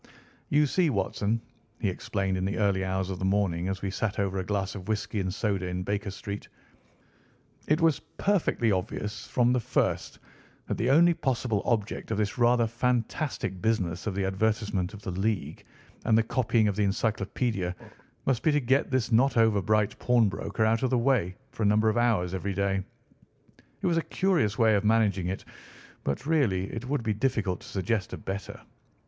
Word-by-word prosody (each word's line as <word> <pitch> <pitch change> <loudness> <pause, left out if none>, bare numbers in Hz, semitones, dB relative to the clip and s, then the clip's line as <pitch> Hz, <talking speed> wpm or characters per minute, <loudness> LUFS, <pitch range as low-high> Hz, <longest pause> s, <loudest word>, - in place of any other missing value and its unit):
"You 150 +1 +4
see, 170 +4 +2
Watson," 105 0 0 0.4
he 105 - 0
explained 95 +1 -1
in 95 - -2
the 100 +2 -1
early 100 -3 +2
hours 95 0 -1
of 90 - -5
the - - -4
morning 95 -3 +1
as 95 0 -3
we 95 - -1
sat 105 +2 -2
over 95 -2 0
a - - -1
glass 95 0 -2
of 95 -2 -8
whisky 105 -1 -2
and 95 -1 -1
soda 100 -2 -1
in 90 0 -3
Baker 100 +1 -2
Street, 100 +1 -6 1.2
"it 155 +3 +2
was 160 -3 +3 0.2
perfectly 180 - +2
obvious 105 +4 -3
from 120 0 +2
the 125 - +2
first 115 - -1 0.5
that - - -3
the 120 - +1
only 170 +5 +6
possible 125 -8 -1
object 110 -3 -1
of 110 - -1
this 105 +3 -1
rather 120 0 +4
fantastic 120 - -1
business 95 -5 0
of 100 - -2
the 100 -1 0
advertisement 100 -1 0
of 105 - -12
the 95 - -3
League, 95 +2 -2 0.4
and 110 - +4
the 115 - +4
copying 115 -2 +2
of 100 - 0
the 105 0 +2
Encyclopædia, 100 -2 -1 0.5
must 130 -3 +1
be 155 - +3
to 150 - +3
get 135 +1 +2
this 130 -3 0
not 125 +3 +3
over 110 -3 +4
bright 110 0 +1
pawnbroker 110 -3 +1
out 110 +1 +2
of 130 - +1
the 125 - +2
way 120 -8 +1 0.2
for - - -8
a - - +3
number 110 +1 +4
of 110 - 0
hours 110 -7 +2
every 95 +1 -2
day. 100 0 +1 1.0
It - - -3
was 170 -2 +2
a - - +3
curious 165 - +1
way 110 -2 +4
of 100 -1 +2
managing 105 -4 +2
it, 95 +1 -4 0.6
but, 70 - -2
really, 115 - +1
it 115 +2 -5
would 145 -4 0
be 110 -1 0
difficult 105 -5 0
to - - -13
suggest 100 +1 -2
a - - -4
better. 100 +1 -6
105 Hz, 190 wpm, -28 LUFS, 95-120 Hz, 1.2 s, only